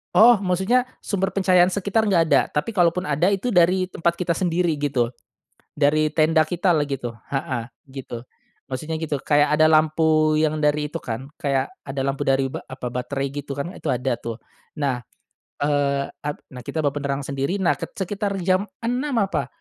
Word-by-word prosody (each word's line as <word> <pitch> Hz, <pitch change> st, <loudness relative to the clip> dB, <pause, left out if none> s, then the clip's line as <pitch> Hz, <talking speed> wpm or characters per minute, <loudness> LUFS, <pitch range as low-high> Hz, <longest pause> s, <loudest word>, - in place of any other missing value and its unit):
Oh, 230 Hz, -1 st, +7 dB
maksudnya 195 Hz, +7 st, +1 dB, 0.2 s
sumber 195 Hz, -1 st, -1 dB
pencahayaan 185 Hz, -2 st, +5 dB
sekitar 200 Hz, +3 st, 0 dB
nggak 175 Hz, -4 st, +4 dB
ada. -, -, +6 dB
Tapi 150 Hz, +10 st, -2 dB
kalaupun 180 Hz, -2 st, +2 dB
ada 150 Hz, +2 st, +1 dB
itu 200 Hz, +5 st, 0 dB
dari 180 Hz, +1 st, +3 dB
tempat 170 Hz, +1 st, 0 dB
kita 175 Hz, -1 st, -1 dB
sendiri 170 Hz, -2 st, 0 dB
gitu, 130 Hz, -5 st, 0 dB, 0.7 s
dari 155 Hz, +1 st, +3 dB
tenda 160 Hz, 0 st, +3 dB
kita 175 Hz, +3 st, +1 dB
lah 155 Hz, -, +2 dB
gitu, 135 Hz, -5 st, -4 dB, 0.2 s
heeh, 135 Hz, -4 st, -2 dB, 0.2 s
gitu. 130 Hz, -3 st, -8 dB, 0.4 s
Maksudnya 155 Hz, +5 st, -4 dB
gitu, 150 Hz, -4 st, -2 dB
kayak 145 Hz, +1 st, +3 dB
ada 155 Hz, +1 st, +5 dB
lampu 155 Hz, 0 st, +3 dB
yang 155 Hz, 0 st, +1 dB
dari 150 Hz, 0 st, +1 dB
itu -, -, -4 dB
kan, 125 Hz, +4 st, -6 dB
kayak 135 Hz, -2 st, 0 dB, 0.2 s
ada 135 Hz, 0 st, -4 dB
lampu 135 Hz, 0 st, -2 dB
dari 135 Hz, 0 st, +2 dB
ba -, -, -4 dB
apa, 130 Hz, -1 st, -7 dB
baterai 135 Hz, +3 st, -3 dB
gitu 140 Hz, 0 st, -5 dB
kan 145 Hz, +5 st, -4 dB
itu -, -, -10 dB
ada 125 Hz, -1 st, -1 dB
tuh, 115 Hz, -1 st, -6 dB, 0.3 s
nah. 140 Hz, -5 st, -1 dB, 0.5 s
Eee 140 Hz, -1 st, 0 dB
ap 150 Hz, 0 st, -5 dB
nah 125 Hz, -2 st, -10 dB
kita 160 Hz, -, -2 dB
bawa 145 Hz, -, +2 dB
penerangan 140 Hz, -1 st, -3 dB
sendiri, 140 Hz, +9 st, -1 dB
nah 175 Hz, -, +2 dB
ke -, -, -4 dB
sekitar 200 Hz, +1 st, -2 dB
jam 185 Hz, +3 st, +2 dB, 0.2 s
6.00 250 Hz, +5 st, -1 dB
apa, 160 Hz, -9 st, -1 dB
155 Hz, 175 wpm, -23 LUFS, 140-180 Hz, 0.7 s, Oh